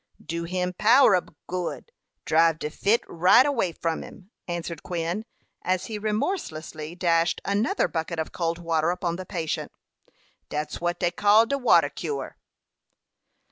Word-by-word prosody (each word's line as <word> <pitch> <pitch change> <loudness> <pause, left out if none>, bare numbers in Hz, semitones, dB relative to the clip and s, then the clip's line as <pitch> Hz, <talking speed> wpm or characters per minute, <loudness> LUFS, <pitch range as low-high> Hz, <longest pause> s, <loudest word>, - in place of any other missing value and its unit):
"Do 170 0 -3
him 180 +1 -2
power 230 -1 +6
ob 180 -3 -3
good. 180 - -4 0.3
Drive 165 0 +4
de 150 - -4
fit 210 +8 +2
right 180 +9 +5
away 235 -11 0
from 165 0 -2
him," 195 +2 -13 0.2
answered 170 -2 -4
Quin, 175 +5 -3 0.4
as 185 0 0
he 215 -2 -5
remorselessly 175 - -3
dashed 170 -1 +2
another 200 +1 +1
bucket 165 +1 -3
of 160 - -3
cold 165 -1 -2
water 165 -1 0
upon 175 -1 -2
the 185 - -7
patient. 165 -5 -3 0.8
"Dat's 150 +2 -4
wat 175 0 -1
dey 175 -2 +1
call 205 +4 +5
de 280 +4 -1
water 250 - +5
cure." 435 - -5
175 Hz, 145 wpm, -25 LUFS, 165-205 Hz, 0.8 s, power